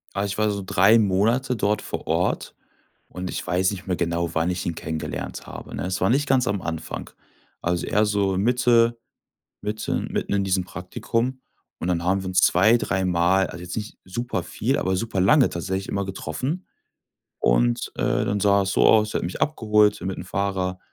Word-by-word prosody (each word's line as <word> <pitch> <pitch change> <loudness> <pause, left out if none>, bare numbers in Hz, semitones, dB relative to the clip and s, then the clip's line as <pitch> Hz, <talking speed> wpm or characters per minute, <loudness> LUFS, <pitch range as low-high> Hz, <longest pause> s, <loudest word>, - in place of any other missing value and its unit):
Ah, 100 +1 0
ich 100 0 -4
war 110 -1 +2
so 100 -1 -3
3 100 +5 +5
Monate 110 +6 +2
dort 105 0 0
vor - - -6
Ort - - -1 0.5
und 90 0 -6
ich - - -5
weiß 95 +2 +2
nicht 95 -1 -8
mehr 90 - 0
genau, 85 0 -1
wann 80 +2 +1
ich 90 0 -2
ihn 85 - -2
kennengelernt 80 0 -5
habe, - - -9
ne? - - -3
Es 90 0 -2
war 95 - +3
nicht 140 +4 +2
ganz 130 -3 +2
am 100 -3 -2
Anfang. 80 -1 -5 0.5
Also, 85 0 -1
eher 105 +1 +2
so 100 -2 +1
Mitte 120 +1 +3 0.6
mitten 105 +1 -3
mitten - - -2
in 100 -1 +1
diesem 95 -1 +1
Praktikum 115 +8 -3 0.4
und 90 - -2
dann 85 -1 +1
haben 95 +2 +1
wir 95 - -6
uns 95 - +3
zwei, 110 +7 +5
dreimal 95 -1 +1
also, 85 - -9
jetzt 90 0 -6
nicht 105 0 -5
superviel, 110 +3 -2
aber 95 0 0
superlange 110 +6 +3
tatsächlich 95 +3 -3
immer 100 -1 -1
getroffen, 125 - -4 0.7
und, - - +1
äh, - - +1
dann 100 0 0
sah 100 -1 +4
es 95 - -2
so - - +3
aus, 110 -1 +4
er - - +1
hat - - -5
mich 90 - -5
abgeholt 105 -7 +3
mit 95 0 -3
'nem 90 - -7
Fahrer 95 -1 -2
95 Hz, 190 wpm, -24 LUFS, 90-110 Hz, 0.7 s, 3